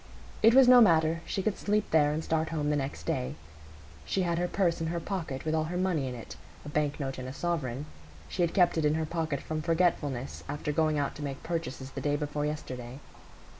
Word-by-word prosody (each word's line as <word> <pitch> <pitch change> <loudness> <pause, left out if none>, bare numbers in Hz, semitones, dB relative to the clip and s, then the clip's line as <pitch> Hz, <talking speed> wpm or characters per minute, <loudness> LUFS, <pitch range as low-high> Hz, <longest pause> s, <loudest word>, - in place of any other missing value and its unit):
It 225 +2 +6
was 265 -1 +8
no 250 -1 +9
matter; 165 -4 +4
she 195 - -2
could 215 -1 -1
sleep 210 0 0
there, 150 -2 +4
and 155 +2 -2
start 160 0 0
home 150 -2 -1
the - - +2
next 140 -1 -3
day. 65 +3 -2 0.7
She 190 - 0
had 170 -1 0
her 180 - +1
purse 175 -3 +1
in 165 - -1
her 170 +1 -2
pocket, 165 -7 -4
with 155 - 0
all 155 -1 +1
her 175 +3 -3
money 180 -7 0
in 125 - -4
it,—a 120 +4 -11
bank 145 -1 -1
note 135 -2 -3
and 130 - -5
a 130 - -6
sovereign; 145 -5 -2 0.4
she 185 - -3
had 170 -1 +1
kept 175 -3 +4
it - - 0
in 150 +1 +3
her 160 0 0
pocket 155 -3 -2
from 155 0 -3
forgetfulness, 155 -6 0
after 145 +1 -2
going 155 0 +2
out 140 -1 -1
to 150 - -6
make 140 -1 -5
purchases 160 -6 -4
the 135 - -6
day 145 +2 +1
before 145 0 -2
yesterday. 130 -4 -6
155 Hz, 225 wpm, -29 LUFS, 145-170 Hz, 0.7 s, no